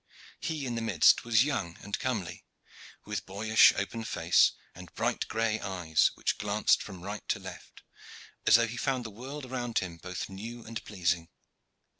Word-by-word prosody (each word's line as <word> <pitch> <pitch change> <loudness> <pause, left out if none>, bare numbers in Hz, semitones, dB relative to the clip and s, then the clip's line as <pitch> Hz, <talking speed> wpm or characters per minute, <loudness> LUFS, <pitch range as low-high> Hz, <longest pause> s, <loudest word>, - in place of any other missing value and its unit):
He 160 -4 -3
in 125 - -2
the 115 - -2
midst 100 -8 +4
was 115 0 +4
young 110 - -2
and 100 - -4
comely, 95 -10 -3 0.6
with - - -4
boyish 110 +3 +5
open 115 +3 -3
face - - +3 0.2
and 90 -2 -12
bright - - -1
gray 110 0 0
eyes, 85 -5 +1
which - - -1
glanced 105 +1 +2
from 95 -4 -9
right 105 +2 -5
to - - +2
left - - -11 0.6
as - - +8
though 115 0 +5
he 120 +1 -6
found 130 0 -1
the 110 - -6
world 130 +6 -7
around 120 -2 -3
him 85 -3 -2
both 90 +2 -5
new 115 +5 -8
and 115 0 -6
pleasing. 90 -4 -1
110 Hz, 170 wpm, -30 LUFS, 95-120 Hz, 0.6 s, as